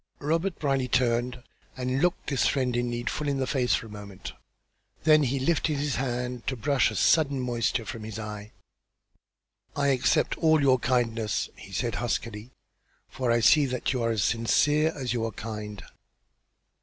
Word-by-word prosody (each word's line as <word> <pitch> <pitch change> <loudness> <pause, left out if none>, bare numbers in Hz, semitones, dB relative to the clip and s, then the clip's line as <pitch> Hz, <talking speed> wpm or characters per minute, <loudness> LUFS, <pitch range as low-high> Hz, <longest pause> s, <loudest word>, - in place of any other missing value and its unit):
Robert 165 +5 -1
Brierly 135 -3 0
turned 125 0 0 0.3
and 130 +1 -1
looked 175 0 +1
this 140 -3 +1
friend 130 -3 0
in 120 0 0
need 120 0 -4
full 150 - -2
in 140 -1 0
the 135 - 0
face 125 -2 +1
for - - -4
a - - -11
moment; 100 -2 -9 0.7
then 155 -1 +6
he 135 -1 0
lifted 155 +1 +1
his 140 -4 -1
hand 125 -1 -3
to 130 - 0
brush 130 +4 +2
a - - -6
sudden 145 -4 +3
moisture 120 -2 -1
from 115 -2 -6
his 110 -1 -6
eye. 105 -1 -7 1.2
"I 140 -1 +1
accept 130 -2 +1
all 160 -1 +4
your 135 -3 +4
kindness," 115 -3 0
he 100 - -13
said, 115 +4 -2
huskily, 115 -1 -3 0.6
"for 125 -2 -1
I 120 0 +3
see 145 +4 +5
that 125 0 -2
you 125 - -1
are 115 - +1
as 110 -3 0
sincere 145 +8 +2
as 130 -4 -3
you 120 -2 -1
are 115 - -2
kind." 105 0 -7
125 Hz, 175 wpm, -27 LUFS, 115-140 Hz, 1.2 s, then